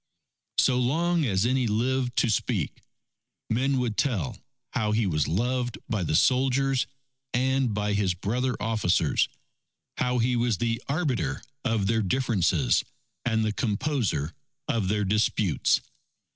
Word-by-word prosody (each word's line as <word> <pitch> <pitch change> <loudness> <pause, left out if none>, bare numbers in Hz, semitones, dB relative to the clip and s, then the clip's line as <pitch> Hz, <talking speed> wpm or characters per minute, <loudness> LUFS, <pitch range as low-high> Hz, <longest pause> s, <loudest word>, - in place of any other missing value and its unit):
So 125 -1 +4
long 165 +6 +1
as 100 -2 +1
any 130 0 +2
lived 125 +3 0
to 120 - +2
speak, 100 - -1 0.7
men 135 +4 +2
would 120 -4 -1
tell 105 - 0 0.4
how 110 -4 0
he 110 0 +2
was 75 -5 +1
loved 120 - -1
by 110 -3 -1
the 80 -3 0
soldiers 135 - +3 0.5
and 130 0 +2
by 105 0 -1
his 100 -3 +1
brother 125 +7 -1
officers; 105 -8 +1 0.7
how 125 0 +1
he 125 +1 +2
was 120 -3 +1
the 115 +2 -1
arbiter 140 -6 -1 0.2
of 110 -3 +1
their 110 +2 +2
differences 95 - +2 0.4
and 110 -2 +1
the 110 - 0
composer 105 - -1 0.3
of 115 -9 0
their 105 +1 +1
disputes. 105 -2 +2
115 Hz, 130 wpm, -27 LUFS, 105-130 Hz, 0.7 s, So